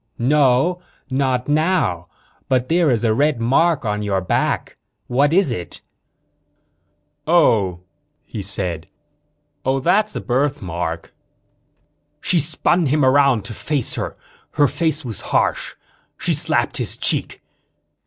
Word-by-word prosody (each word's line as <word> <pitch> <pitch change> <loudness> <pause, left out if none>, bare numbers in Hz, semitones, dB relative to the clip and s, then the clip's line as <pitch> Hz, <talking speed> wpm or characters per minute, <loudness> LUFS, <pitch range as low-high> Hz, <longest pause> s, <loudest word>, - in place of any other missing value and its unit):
"No 145 +6 +2 0.3
not 130 -2 0
now. 145 - +1 0.4
But 130 -1 +1
there 170 -1 +3
is 120 -3 +1
a 110 -2 +3
red 140 +1 +1
mark 135 +5 +2
on 105 -1 -1
your 100 -2 0
back. 90 - -1 0.3
What 140 +4 +2
is 180 -4 +3
it?" 90 -7 -4 1.4
"Oh," 105 - +3 0.4
he 110 - -6
said. 90 -4 -3 0.8
"Oh 135 +1 +1
that's 210 +9 +1
a - - -2
birthmark." 90 - -2 1.1
She 175 - +1
spun 165 +2 +1
him 145 0 +2
around 130 -5 +3
to 115 - -6
face 140 +3 -1
her. - - -5 0.4
Her 145 - +4
face 160 -1 0
was 115 -4 -5
harsh. - - 0 0.4
She - - -1
slapped - - 0
his - - -3
cheek. - - -1
130 Hz, 125 wpm, -20 LUFS, 105-150 Hz, 1.4 s, Her